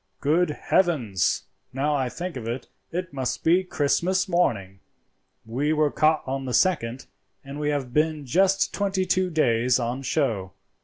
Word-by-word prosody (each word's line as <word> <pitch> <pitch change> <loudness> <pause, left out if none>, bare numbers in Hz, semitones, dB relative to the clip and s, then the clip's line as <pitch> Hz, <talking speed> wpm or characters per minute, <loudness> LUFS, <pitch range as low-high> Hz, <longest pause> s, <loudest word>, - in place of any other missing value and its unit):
Good 160 +4 +2
heavens! 140 - +1 0.3
now 145 +3 0
I 135 -3 0
think 175 +5 -6
of 115 -3 -6
it, 120 +3 -4 0.2
it 180 0 -4
must 130 -2 -3
be 175 +3 +4
Christmas 185 +4 0
morning. 105 - 0 0.7
We 135 +7 0
were 150 -1 +2
caught 155 0 +2
on 135 0 -3
the 125 -3 -1
second, 130 -8 +1 0.4
and 140 +2 -8
we 150 0 0
have 135 -4 -2
been 155 0 +1
just 190 +8 +2
twenty 195 -2 0
two 185 0 +1
days 125 -6 +2
on 125 +2 -2
show. 115 - -1
145 Hz, 155 wpm, -25 LUFS, 125-175 Hz, 0.7 s, be